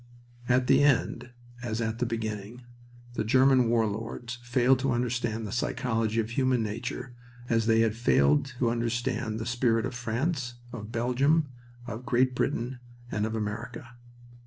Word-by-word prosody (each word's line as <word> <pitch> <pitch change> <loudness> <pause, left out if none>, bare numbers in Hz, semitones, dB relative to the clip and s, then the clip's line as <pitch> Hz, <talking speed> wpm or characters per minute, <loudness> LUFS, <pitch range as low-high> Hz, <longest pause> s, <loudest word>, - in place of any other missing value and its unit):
At 125 +1 +4
the - - +5
end, 135 -2 +2 0.3
as 115 -2 -3
at 115 0 -2
the 125 - 0
beginning, 110 +1 -4 0.5
the - - -1
German 130 +1 +4
war 115 -1 +3
lords 115 +3 -5
failed 125 +1 +3
to 135 -1 +1
understand 120 -2 -1
the 100 - -5
psychology 115 -2 0
of 110 0 -1
human 130 -1 +2
nature 120 +3 -4 0.4
as 115 -1 +2
they 115 0 +5
had 115 -2 +2
failed 75 -11 +3
to 120 -2 +2
understand 120 -1 -1
the 115 - -4
spirit 120 -1 +1
of - - -4
France, 125 +2 -2 0.2
of 110 -2 -7
Belgium, 135 +6 +2 0.4
of 115 0 -6
Great 130 0 +2
Britain, 125 +1 -1 0.3
and 105 +1 0
of 110 - -4
America. 115 +3 -4
120 Hz, 155 wpm, -28 LUFS, 110-125 Hz, 0.5 s, the